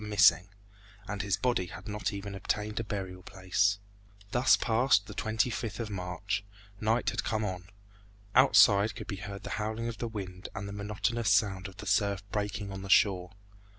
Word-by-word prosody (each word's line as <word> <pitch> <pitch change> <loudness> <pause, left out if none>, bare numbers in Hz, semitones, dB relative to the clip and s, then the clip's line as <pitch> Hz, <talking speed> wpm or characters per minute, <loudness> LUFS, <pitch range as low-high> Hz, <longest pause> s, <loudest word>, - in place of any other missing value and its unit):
missing, 100 -4 +5 0.6
and 105 -1 -3
his 100 -1 0
body 120 -8 0
had 95 +2 -10
not 105 0 -2
even 100 0 -6
obtained 105 +2 -2
a - - -1
burial 95 -3 -5
place. 95 +2 +1 0.5
Thus 125 +4 +5
passed 115 -2 +3
the - - -9
25th 110 -1 -1
of 110 -3 -4
March. 100 +2 -3 0.4
Night 110 +3 +1
had - - -2
come 110 -1 -1
on. 90 -3 -4 0.7
Outside 110 -4 +6
could 110 - -7
be 100 -3 -5
heard 100 +1 -7
the - - -6
howling 110 +2 -2
of 115 - -5
the 120 - -2
wind 95 -5 -7
and 100 +1 -4
the 100 - -6
monotonous 105 +2 -1
sound 100 -2 +2
of 95 - -13
the - - -8
surf 100 0 +1
breaking 105 -1 -3
on 95 0 -6
the 95 - -8
shore. 95 -2 +3
105 Hz, 180 wpm, -30 LUFS, 95-110 Hz, 0.7 s, Outside